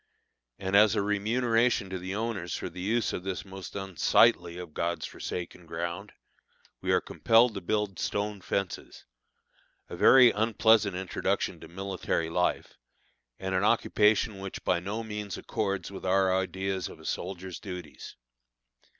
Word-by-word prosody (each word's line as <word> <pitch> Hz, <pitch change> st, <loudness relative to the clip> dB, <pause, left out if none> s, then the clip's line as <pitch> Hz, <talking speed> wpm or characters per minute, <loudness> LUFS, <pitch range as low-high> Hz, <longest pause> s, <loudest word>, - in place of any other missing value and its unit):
And 95 Hz, +1 st, -2 dB
as 105 Hz, 0 st, +6 dB
a -, -, +2 dB
remuneration 115 Hz, +2 st, +1 dB
to 95 Hz, -, -3 dB
the 95 Hz, +2 st, -5 dB
owners 105 Hz, -6 st, -3 dB
for -, -, -5 dB
the 90 Hz, +1 st, -8 dB
use 110 Hz, +4 st, 0 dB
of -, -, -3 dB
this 95 Hz, +1 st, -4 dB
most 95 Hz, -1 st, -9 dB
unsightly 95 Hz, -2 st, +3 dB
of 90 Hz, -4 st, -8 dB
God's 85 Hz, +2 st, -2 dB
forsaken 90 Hz, -1 st, -6 dB
ground, 85 Hz, +1 st, -4 dB, 0.7 s
we -, -, 0 dB
are -, -, +4 dB
compelled 115 Hz, +1 st, +3 dB
to 100 Hz, -, -5 dB
build 105 Hz, +1 st, -1 dB
stone 105 Hz, -1 st, -2 dB
fences 95 Hz, 0 st, -4 dB, 0.8 s
a -, -, -6 dB
very 130 Hz, -3 st, +7 dB
unpleasant 110 Hz, -2 st, +3 dB
introduction 95 Hz, 0 st, -2 dB
to -, -, -11 dB
military 90 Hz, -2 st, -3 dB
life, 90 Hz, +1 st, -1 dB, 0.6 s
and 95 Hz, 0 st, -4 dB
an 95 Hz, +1 st, +1 dB
occupation 105 Hz, -1 st, +2 dB
which 95 Hz, 0 st, -7 dB
by 90 Hz, -, +2 dB
no 105 Hz, +6 st, -4 dB
means 105 Hz, -3 st, -5 dB
accords 100 Hz, -4 st, -3 dB
with 95 Hz, -, -8 dB
our 95 Hz, 0 st, +3 dB
ideas 95 Hz, 0 st, -2 dB
of -, -, -12 dB
a -, -, -14 dB
soldier's 95 Hz, -1 st, -4 dB
duties. 90 Hz, -4 st, -8 dB
95 Hz, 150 wpm, -29 LUFS, 90-105 Hz, 0.8 s, very